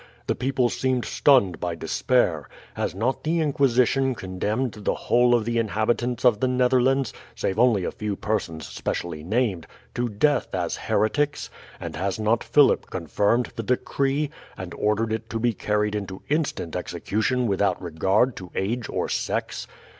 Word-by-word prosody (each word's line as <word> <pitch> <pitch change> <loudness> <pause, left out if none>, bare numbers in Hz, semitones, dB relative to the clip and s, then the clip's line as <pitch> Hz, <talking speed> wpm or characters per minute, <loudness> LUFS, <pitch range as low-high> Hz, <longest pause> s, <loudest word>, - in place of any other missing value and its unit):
The - - +1
people 130 -1 +1
seemed 130 -1 0
stunned 125 - +3
by 85 -1 -2
despair. 85 - 0 0.2
Has - - -3
not 120 +7 -1
the 165 +2 +1
Inquisition 135 -3 +2
condemned 105 +6 -2
the 105 - 0
whole 120 0 +3
of 115 -3 0
the 115 0 0
inhabitants 115 +3 0
of 115 -4 +5
the 130 - +2
Netherlands 125 0 +2 0.2
save 95 +3 -2
only 115 -6 +4
a - - -2
few 105 -2 -3
persons 95 -7 -2
specially 80 -3 -4
named 100 -2 0 0.3
to 120 0 -1
death 130 +6 +1
as - - -1
heretics? 145 +7 0 0.3
and - - -6
has 95 0 -2
not 110 +2 +1
Philip 145 -2 +4
confirmed 100 +7 0
the - - -3
decree, 135 +5 0 0.3
and 90 -2 -7
ordered 110 +1 0
it 110 0 -4
to 115 - -3
be 120 0 +1
carried 105 0 0
into 100 -3 -5
instant 145 - -1
execution 105 +8 -1
without 100 -3 +1
regard 95 +8 +1
to 90 -1 -8
age 115 +5 -2
or - - -1
sex? - - -2
115 Hz, 155 wpm, -24 LUFS, 100-125 Hz, 0.3 s, of